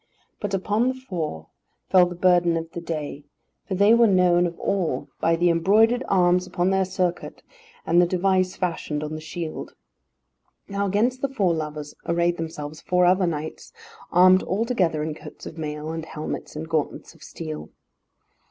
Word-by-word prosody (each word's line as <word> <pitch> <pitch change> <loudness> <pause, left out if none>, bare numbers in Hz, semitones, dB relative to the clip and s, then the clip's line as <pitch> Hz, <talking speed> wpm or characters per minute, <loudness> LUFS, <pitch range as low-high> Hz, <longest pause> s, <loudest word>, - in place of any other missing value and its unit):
But 205 -1 -2
upon 210 +5 +1
the 260 - +1
four 170 - -5 0.5
fell 180 -2 +6
the 175 - -7
burden 175 -1 +3
of 165 0 -5
the 170 - -6
day, 150 -3 -5 0.4
for 190 - -2
they 200 +4 +5
were 235 0 +6
known 180 -2 +4
of 170 - -8
all 170 -9 -1
by 165 0 +2
the 175 +1 +3
embroidered 215 +9 +3
arms 180 -1 +3
upon 180 0 0
their 190 0 +2
surcoat, 180 -2 -3 0.4
and 170 +2 +4
the 175 - +3
device 185 +1 +1
fashioned 160 -4 -2
on 155 0 -5
the 155 - -5
shield. 160 0 -6 0.9
Now 200 0 -1
against 235 +6 +1
the 275 - 0
four 200 -10 +1
lovers 150 -2 -5
arrayed 170 +1 +1
themselves 155 -2 -6
four 180 0 +2
other 185 +1 +3
knights, 155 - -5 0.4
armed 185 +1 +6
altogether 190 -7 0
in 155 0 -3
coats 155 - -12
of 160 - -8
mail, 150 0 -4
and 160 0 -4
helmets 155 -1 -6
and 155 +1 -5
gauntlets 160 -3 -2
of - - -22
steel. 75 -1 -7
175 Hz, 170 wpm, -24 LUFS, 160-190 Hz, 0.9 s, fell